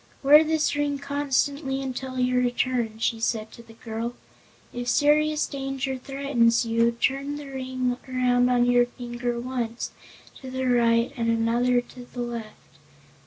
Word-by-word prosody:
"Wear 295 Hz, +3 st, +8 dB
this 315 Hz, -1 st, +1 dB
ring 290 Hz, -1 st, 0 dB
constantly 280 Hz, 0 st, -1 dB
until 260 Hz, -1 st, -5 dB
your 250 Hz, 0 st, +2 dB
return," 245 Hz, -2 st, 0 dB
she 225 Hz, 0 st, -1 dB
said 220 Hz, -1 st, -1 dB
to -, -, -12 dB
the 230 Hz, -1 st, -16 dB
girl. 230 Hz, +1 st, -5 dB, 0.6 s
"If 245 Hz, 0 st, -5 dB
serious 300 Hz, +3 st, +3 dB
danger 270 Hz, -1 st, -3 dB
threatens 255 Hz, -3 st, +1 dB
you, 230 Hz, +1 st, +2 dB
turn 275 Hz, +4 st, -1 dB
the 295 Hz, 0 st, -7 dB
ring 255 Hz, -1 st, -2 dB
around 250 Hz, -1 st, +2 dB
on 245 Hz, -1 st, +3 dB
your 245 Hz, 0 st, +4 dB
finger 240 Hz, -1 st, -4 dB
once 240 Hz, -2 st, -3 dB, 0.5 s
to 260 Hz, -, -8 dB
the 260 Hz, 0 st, -3 dB
right 235 Hz, -1 st, +3 dB
and 230 Hz, -2 st, -1 dB
another 235 Hz, +2 st, +2 dB
turn 245 Hz, 0 st, -13 dB
to -, -, -26 dB
the 245 Hz, -, -4 dB
left. 235 Hz, -2 st, -8 dB
250 Hz, 155 wpm, -25 LUFS, 235-270 Hz, 0.6 s, Wear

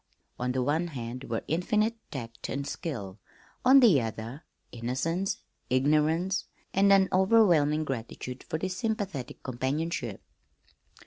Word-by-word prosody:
On 125 Hz, +1 st, 0 dB
the 130 Hz, 0 st, 0 dB
one 155 Hz, +6 st, +1 dB
hand 125 Hz, -3 st, -6 dB
were 115 Hz, -1 st, -3 dB
infinite 210 Hz, +8 st, +1 dB
tact 115 Hz, -4 st, -6 dB
and 140 Hz, +1 st, -2 dB
skill; 110 Hz, -, -5 dB, 0.4 s
on 270 Hz, +2 st, +8 dB
the 190 Hz, -, +6 dB
other, 115 Hz, +6 st, -5 dB, 0.3 s
innocence, 130 Hz, +11 st, -2 dB, 0.3 s
ignorance, 155 Hz, +8 st, +2 dB, 0.3 s
and 200 Hz, +1 st, +4 dB
an 195 Hz, -1 st, +6 dB
overwhelming 180 Hz, -7 st, +4 dB
gratitude 125 Hz, -1 st, -5 dB
for 160 Hz, -, -3 dB
this 185 Hz, +3 st, -3 dB
sympathetic 195 Hz, -, -3 dB
companionship. 130 Hz, -, -2 dB
150 Hz, 120 wpm, -29 LUFS, 125-185 Hz, 0.4 s, on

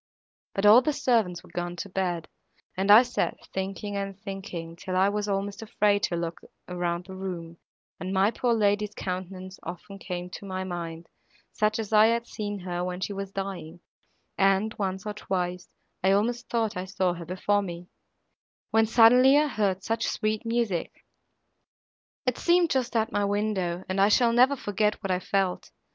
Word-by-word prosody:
But 195 Hz, -, 0 dB
all 215 Hz, +4 st, +9 dB
the 300 Hz, +4 st, 0 dB
servants 230 Hz, -11 st, +1 dB
were -, -, -17 dB
gone 175 Hz, 0 st, -3 dB
to 175 Hz, -, -5 dB
bed, 180 Hz, -3 st, -2 dB, 0.5 s
and 190 Hz, +2 st, -1 dB
I 215 Hz, +4 st, +10 dB
sat, 245 Hz, -, -2 dB, 0.2 s
thinking 195 Hz, +2 st, -4 dB
and 195 Hz, -1 st, -4 dB
thinking, 190 Hz, -5 st, -6 dB
till 185 Hz, +2 st, -5 dB
I 190 Hz, +2 st, +4 dB
was 210 Hz, 0 st, -2 dB
almost 200 Hz, +1 st, -2 dB
afraid 210 Hz, -2 st, +1 dB
to 175 Hz, -, -2 dB
look 170 Hz, -1 st, -4 dB, 0.3 s
round 175 Hz, -1 st, -2 dB
the 190 Hz, -, -9 dB
room, 175 Hz, -3 st, -6 dB, 0.4 s
and 185 Hz, -, -4 dB
my 195 Hz, +2 st, +3 dB
poor 235 Hz, 0 st, +1 dB
lady's 210 Hz, -1 st, +1 dB
countenance 185 Hz, 0 st, -5 dB
often 195 Hz, +3 st, -8 dB
came 180 Hz, -2 st, -5 dB
to -, -, -8 dB
my 185 Hz, 0 st, -3 dB
mind, 170 Hz, -2 st, -6 dB, 0.4 s
such 215 Hz, 0 st, +1 dB
as 220 Hz, -1 st, -4 dB
I 215 Hz, +1 st, +7 dB
had 235 Hz, +1 st, +1 dB
seen 205 Hz, -3 st, -4 dB
her 175 Hz, -1 st, -3 dB
when 180 Hz, 0 st, -3 dB
she 200 Hz, -, -3 dB
was 195 Hz, 0 st, -5 dB
dying, 185 Hz, -4 st, -5 dB, 0.6 s
and, 195 Hz, +2 st, +3 dB
once 190 Hz, -1 st, -2 dB
or 210 Hz, -, -3 dB
twice, 180 Hz, -3 st, -3 dB, 0.3 s
I 190 Hz, +1 st, +4 dB
almost 235 Hz, +4 st, 0 dB
thought 225 Hz, -3 st, 0 dB
I 180 Hz, +1 st, -3 dB
saw 185 Hz, -1 st, 0 dB
her 170 Hz, -1 st, -8 dB
before 190 Hz, +4 st, +1 dB
me,—when 180 Hz, +4 st, -5 dB
suddenly 250 Hz, +4 st, +7 dB
I 300 Hz, -, +4 dB
heard 195 Hz, -6 st, 0 dB
such 225 Hz, +2 st, -1 dB
sweet 215 Hz, +1 st, -1 dB
music! 230 Hz, -7 st, -2 dB, 1.2 s
It 255 Hz, -2 st, 0 dB
seemed 345 Hz, -1 st, +3 dB
just 255 Hz, -2 st, 0 dB
at 220 Hz, -1 st, +1 dB
my 205 Hz, -, 0 dB
window, 200 Hz, -4 st, -1 dB
and 190 Hz, +1 st, 0 dB
I 200 Hz, -, +6 dB
shall 230 Hz, +2 st, +4 dB
never 255 Hz, +4 st, +5 dB
forget 210 Hz, -4 st, 0 dB
what 195 Hz, -, -1 dB
I 180 Hz, -, +1 dB
felt. 190 Hz, 0 st, -1 dB
195 Hz, 175 wpm, -27 LUFS, 180-215 Hz, 1.2 s, I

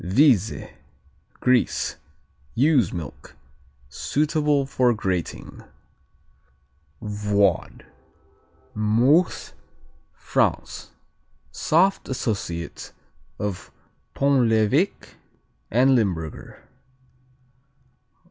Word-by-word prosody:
Vize 110 Hz, -, +3 dB, 0.8 s
Greece 125 Hz, -1 st, +1 dB, 0.6 s
Ewe's 130 Hz, -, +3 dB
milk; 85 Hz, -4 st, -8 dB, 0.5 s
suitable 150 Hz, -, 0 dB
for 125 Hz, -3 st, +2 dB
grating. 95 Hz, -5 st, -4 dB, 1.4 s
Void 105 Hz, -2 st, 0 dB, 0.9 s
Meuse, 120 Hz, +11 st, +2 dB, 0.6 s
France -, -, -1 dB, 0.6 s
Soft 185 Hz, +5 st, +1 dB
associate 100 Hz, -9 st, -4 dB, 0.4 s
of 100 Hz, 0 st, -5 dB, 0.4 s
Pont 135 Hz, -4 st, +3 dB
l'Evêque 115 Hz, -, +1 dB, 0.5 s
and 130 Hz, +4 st, +4 dB
Limburger. 90 Hz, -, -2 dB
115 Hz, 55 wpm, -23 LUFS, 100-140 Hz, 1.4 s, and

